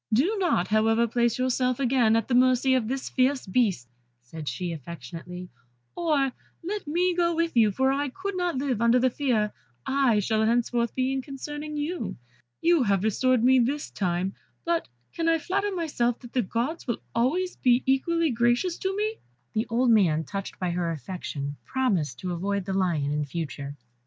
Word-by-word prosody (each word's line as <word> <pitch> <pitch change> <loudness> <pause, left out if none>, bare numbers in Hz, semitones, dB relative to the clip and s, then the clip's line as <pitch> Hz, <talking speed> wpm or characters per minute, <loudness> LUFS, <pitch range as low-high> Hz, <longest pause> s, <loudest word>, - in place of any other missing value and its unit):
"Do 295 - +3
not, 290 - +1
however, 225 +2 +3
place 235 0 +1
yourself 255 0 +1
again 245 -4 +3
at 225 - +1
the 255 - -1
mercy 255 +1 +4
of 250 -4 +1
this 265 +2 -3
fierce 260 +1 +1
beast," 190 - +1 0.4
said 150 +4 -6
she, 170 +8 -3
affectionately, 170 +4 -8 0.5
"or 300 -6 +1 0.3
let 400 0 -4
me 355 +4 +2
go 340 -1 +1
with 335 -2 0
you, 220 -3 +5
for 265 +6 +2
I 285 +1 0
could 380 +8 -5
not 355 -5 -1
live 260 -5 -1
under 235 +1 +5
the 255 0 +3
fear 230 -7 0 0.3
I 265 -5 +3
shall 215 +2 +1
henceforth 235 +1 +1
be 260 0 +1
in 270 - -1
concerning 295 +2 -6
you. 320 +4 -3 0.5
You 335 -2 +4
have 200 -5 +2
been - - -2
restored 255 +3 +2
to - - +2
me 260 0 +6
this 275 +5 -1
time, 185 0 -1 0.3
but 335 0 0 0.3
can 330 0 0
I 330 - +4
flatter 395 +6 -1
myself 285 -10 0
that 240 -2 -12
the 255 - +2
Gods 240 - -3
will 235 - +1
be - - -25
always 325 +11 0
equally 270 +6 +2
gracious 240 +9 +1
to 385 +1 -2
me." 430 +1 -1 0.4
The 220 +2 0
old 240 +1 +3
man, 170 -8 +4
touched 195 +6 -6
by 180 -2 -1
her 170 -1 -1
affection, 145 -2 -5
promised 190 - 0
to 180 -1 -3
avoid 200 +2 -2
the 195 - -3
lion 170 -7 0
in 150 0 0
future. 145 -1 -5
245 Hz, 185 wpm, -26 LUFS, 195-285 Hz, 0.5 s, me